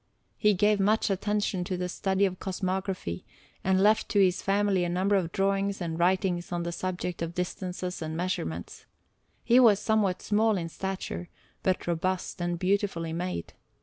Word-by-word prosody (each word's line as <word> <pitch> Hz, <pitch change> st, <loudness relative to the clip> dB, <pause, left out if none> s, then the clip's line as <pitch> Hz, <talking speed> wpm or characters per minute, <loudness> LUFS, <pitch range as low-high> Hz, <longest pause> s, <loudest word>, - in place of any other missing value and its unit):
He 210 Hz, -2 st, +4 dB
gave 210 Hz, +2 st, +3 dB
much 210 Hz, +2 st, +2 dB
attention 205 Hz, -1 st, 0 dB
to 185 Hz, 0 st, -2 dB
the 180 Hz, 0 st, -2 dB
study 190 Hz, +2 st, +1 dB
of 185 Hz, -2 st, -3 dB
cosmography, 185 Hz, -, -3 dB, 0.4 s
and 190 Hz, 0 st, +3 dB
left 215 Hz, +1 st, +3 dB
to 205 Hz, -, +2 dB
his 185 Hz, -2 st, +3 dB
family 195 Hz, -2 st, +2 dB
a 175 Hz, -, -1 dB
number 190 Hz, +3 st, +2 dB
of 175 Hz, -4 st, 0 dB
drawings 195 Hz, +1 st, 0 dB
and 165 Hz, -2 st, -3 dB
writings 180 Hz, +1 st, +1 dB
on 175 Hz, -1 st, -1 dB
the 170 Hz, -, -3 dB
subject 180 Hz, 0 st, -3 dB
of 165 Hz, 0 st, -3 dB
distances 180 Hz, 0 st, -4 dB
and 160 Hz, 0 st, -4 dB
measurements. 85 Hz, -, -4 dB, 0.6 s
He 240 Hz, +2 st, +5 dB
was 225 Hz, -5 st, +7 dB
somewhat 210 Hz, -3 st, +1 dB
small 215 Hz, 0 st, +2 dB
in 165 Hz, -2 st, -3 dB
stature, 190 Hz, -1 st, -5 dB, 0.3 s
but 185 Hz, -1 st, 0 dB
robust 175 Hz, +2 st, -2 dB
and 175 Hz, 0 st, -1 dB
beautifully 185 Hz, -3 st, 0 dB
made. 175 Hz, -, -4 dB
185 Hz, 165 wpm, -28 LUFS, 175-200 Hz, 0.6 s, was